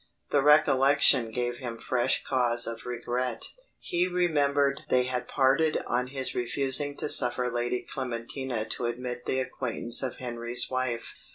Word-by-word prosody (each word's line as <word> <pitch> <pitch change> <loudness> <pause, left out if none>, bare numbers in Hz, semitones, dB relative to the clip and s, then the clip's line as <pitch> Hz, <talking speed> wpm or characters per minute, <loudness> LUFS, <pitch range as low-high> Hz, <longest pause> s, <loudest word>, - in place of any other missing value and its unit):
The 145 - +3
recollection 140 -3 +4
gave 120 +1 -3
him 120 -3 -7
fresh 125 +2 -1
cause 120 -2 +3
of 115 +1 -6
regret. 125 0 -3 0.3
He 175 +1 -1
remembered 145 -6 +1
they 125 0 +3
had 125 -1 -4
parted 140 +4 +2
on 125 +1 -1
his 135 0 -3
refusing 135 +3 0
to - - -2
suffer 125 -2 +5
Lady 120 +1 -2
Clementina 125 -1 -4
to 120 - -3
admit 125 0 -5
the 130 - -1
acquaintance 125 -2 -1
of 130 -3 -3
Henry's 120 0 0
wife. 130 -2 -3
125 Hz, 145 wpm, -27 LUFS, 120-135 Hz, 0.3 s, suffer